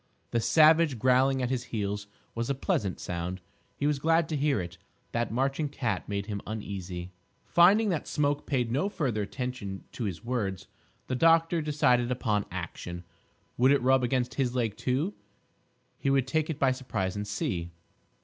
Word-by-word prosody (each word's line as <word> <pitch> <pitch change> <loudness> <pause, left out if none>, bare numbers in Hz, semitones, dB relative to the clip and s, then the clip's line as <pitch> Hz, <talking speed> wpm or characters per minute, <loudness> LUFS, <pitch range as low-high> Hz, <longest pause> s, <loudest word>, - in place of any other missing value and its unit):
The 120 - +2
savage 155 +1 +5
growling 130 +3 +3
at 125 - -1
his 125 -1 -1
heels 105 -2 -3 0.3
was 115 +2 -3
a 140 - +1
pleasant 100 -7 -1
sound. 90 +1 -4 0.4
He 140 - -1
was 145 -1 +1
glad 165 +2 +3
to 155 - -1
hear 145 -4 +1
it. 85 -1 -6 0.3
That 120 -1 -1
marching 135 +5 0
cat 125 -7 -2
made 100 -1 -2
him 100 -2 -4
uneasy. 95 -4 -5 0.3
Finding 200 +6 +5
that 170 -5 -1
Smoke 145 0 0
paid 125 -5 0
no 145 +11 +1
further 130 - -1
attention 105 -3 -5
to 120 - -4
his 95 +2 -5
words, 105 -7 -2 0.4
the - - -3
doctor 165 +4 +4
decided 140 -5 +2
upon 110 -5 0
action. 90 -1 -6 0.5
Would 130 +3 +5
it 140 -3 +3
rub 130 0 +4
against 125 0 0
his 130 -3 -1
leg, 115 -4 0
too? 140 +10 -1 0.9
He 135 - 0
would 135 -2 +3
take 155 +3 0
it 155 - -2
by 135 -3 +3
surprise 115 -8 -2
and 105 0 -4
see. 90 -4 -2
125 Hz, 170 wpm, -29 LUFS, 105-145 Hz, 0.9 s, savage